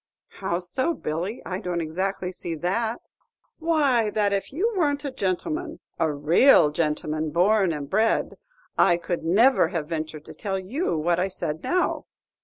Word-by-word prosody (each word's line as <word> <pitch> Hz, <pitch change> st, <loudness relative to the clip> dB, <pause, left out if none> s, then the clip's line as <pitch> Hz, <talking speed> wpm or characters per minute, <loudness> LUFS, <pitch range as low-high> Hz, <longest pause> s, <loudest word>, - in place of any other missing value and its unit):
"How 190 Hz, -3 st, -1 dB
so, 185 Hz, -, -1 dB
Billy? 175 Hz, +10 st, -4 dB
I 185 Hz, 0 st, -3 dB
don't 180 Hz, -4 st, -2 dB
exactly 180 Hz, +3 st, -2 dB
see 170 Hz, -2 st, -5 dB
that." 220 Hz, +8 st, -1 dB, 0.6 s
"Why, 285 Hz, -9 st, +2 dB
that 205 Hz, -1 st, +1 dB
if 195 Hz, -, -2 dB
you 405 Hz, +11 st, 0 dB
weren't 290 Hz, -5 st, 0 dB
a 280 Hz, -, -2 dB
gentleman, 310 Hz, -, -3 dB, 0.2 s
a 160 Hz, -, +2 dB
raal 150 Hz, -, +5 dB
gentleman, 155 Hz, 0 st, -1 dB
born 190 Hz, +3 st, +3 dB
and 145 Hz, -3 st, -4 dB
bred, 220 Hz, +8 st, +1 dB, 0.5 s
I 175 Hz, -, +5 dB
could 175 Hz, 0 st, -3 dB
never 225 Hz, +11 st, +4 dB
have 165 Hz, -5 st, -3 dB
ventured 155 Hz, -2 st, -4 dB
to -, -, -10 dB
tell 195 Hz, -2 st, -3 dB
you 190 Hz, -, -2 dB
what 170 Hz, +2 st, +1 dB
I 185 Hz, -, +1 dB
said 160 Hz, -4 st, -4 dB
now. 365 Hz, -, 0 dB
190 Hz, 160 wpm, -25 LUFS, 165-245 Hz, 0.6 s, raal